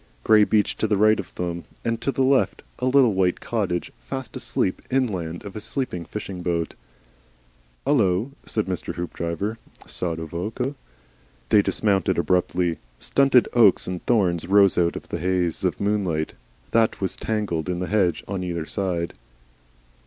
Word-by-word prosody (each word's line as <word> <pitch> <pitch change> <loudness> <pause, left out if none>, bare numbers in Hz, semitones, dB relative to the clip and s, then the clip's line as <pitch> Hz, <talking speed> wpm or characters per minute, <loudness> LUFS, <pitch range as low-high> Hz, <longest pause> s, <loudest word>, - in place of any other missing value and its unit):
Grey 110 -1 +6
beach 105 0 +2
to 110 - 0
the 105 -1 +2
right 110 +1 +4
of 100 - -7
them 85 -1 -3 0.2
and 115 0 -1
to 140 - 0
the 135 - +1
left, 135 0 +2 0.2
and 130 +1 +1
a 140 - +4
little 125 -6 +5
white 95 -1 +1
cottage 100 -7 -2
fast 130 -4 -6
asleep 95 - -1
inland 95 -10 -1
of 100 - -8
a - - -3
sleeping 105 -7 -3
fishing 95 -2 -6
boat. 85 -2 -1 1.1
"Hullo!" 115 -4 +2
said 110 - -1
Mr. 90 -2 -4
Hoopdriver, 85 +5 -3 0.3
sotto 80 -2 -3
voce. 110 - -3 0.8
They 105 - +6
dismounted 100 -2 +1
abruptly. 90 -1 +1 0.2
Stunted 135 - +4
oaks 110 -6 +5
and 90 -1 -4
thorns 90 -9 +2
rose 100 0 +5
out 85 -1 +2
of - - -7
the 85 - -3
haze 90 -1 0
of - - 0
moonlight 95 -7 0 0.4
that 115 -1 +2
was 95 - -2
tangled 95 -7 -2
in 90 - -1
the 90 - -2
hedge 95 -5 +1
on 95 -2 -3
either 85 -3 -3
side. 90 -3 -2
95 Hz, 160 wpm, -24 LUFS, 85-110 Hz, 1.1 s, Grey